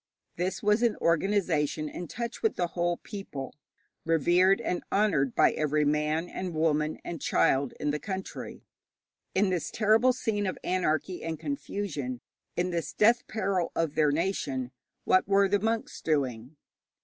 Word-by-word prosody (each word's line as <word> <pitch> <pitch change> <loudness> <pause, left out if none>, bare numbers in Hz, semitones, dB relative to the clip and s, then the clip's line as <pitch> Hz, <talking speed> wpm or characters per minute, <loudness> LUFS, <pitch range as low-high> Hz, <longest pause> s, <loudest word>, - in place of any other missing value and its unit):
This 180 +4 -2
was 210 +2 +3
an 235 -3 +3
organization 165 -4 +1
in 175 +3 -6
touch 235 +7 -5
with 445 - +1
the 175 -1 -1
whole 175 0 0
people, 150 -10 -7 0.5
revered 175 +4 +4
and 180 - -2
honoured 165 - +2
by - - +5
every 150 0 +1
man 150 +3 +1
and 180 -2 -5
woman 155 -1 +1
and 165 -4 -5
child 135 -1 +2
in 150 - 0
the 150 - -2
country. 190 0 -6 0.7
In 190 0 +3
this 180 -3 -1
terrible 220 +3 +4
scene 210 -5 -1
of 185 - -3
anarchy 180 0 -1
and 160 -1 -4
confusion, 175 - -4 0.4
in 180 +1 0
this 170 -1 -3
death 235 +3 +3
peril 195 -5 -1
of 165 -3 0
their 155 -1 +3
nation, 145 -6 -1 0.3
what 185 - +3
were 200 0 +4
the 205 +1 +2
monks 225 +2 -2
doing? 135 -3 -1
175 Hz, 150 wpm, -28 LUFS, 150-200 Hz, 0.7 s, by